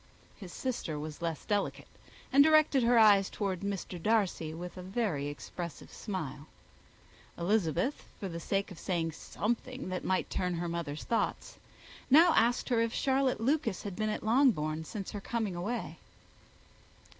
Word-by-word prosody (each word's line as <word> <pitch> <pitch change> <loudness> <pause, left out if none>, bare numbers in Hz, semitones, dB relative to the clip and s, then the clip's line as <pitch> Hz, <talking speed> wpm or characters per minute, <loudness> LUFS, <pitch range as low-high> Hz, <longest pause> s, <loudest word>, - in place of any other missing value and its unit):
His 190 -5 -10
sister 225 - -3
was 150 +2 -6
less 165 -3 -3
delicate, 205 -1 -1 0.5
and 280 +1 +8
directed 310 -3 +5
her 240 0 +4
eye 210 -3 +7
towards 195 -3 -2
Mr. 195 -3 -4
Darcy 200 -6 +1
with 175 +2 -7
a 185 - -7
very 185 -7 -1
expressive 170 +3 -7
smile. 155 - -5 0.9
Elizabeth, 200 - 0 0.2
for 195 - -3
the 170 -2 -5
sake 195 +3 -1
of 180 - -10
saying 165 -3 -1
something 240 - -3
that 185 0 -3
might 185 0 0
turn 180 -1 -1
her 170 +1 -2
mother's 165 -3 -4
thoughts, 230 - -2 0.5
now 320 +5 +7
asked 240 +3 +2
her 235 -2 +3
if 230 0 -1
Charlotte 265 -2 +1
Lucas 240 -4 0
had 200 -3 -5
been 215 +1 -1
at 215 - -3
Longbourn 205 - +2
since 195 +3 -6
her 205 - -5
coming 220 -4 -2
away. 205 +8 -4
200 Hz, 155 wpm, -31 LUFS, 170-235 Hz, 0.9 s, and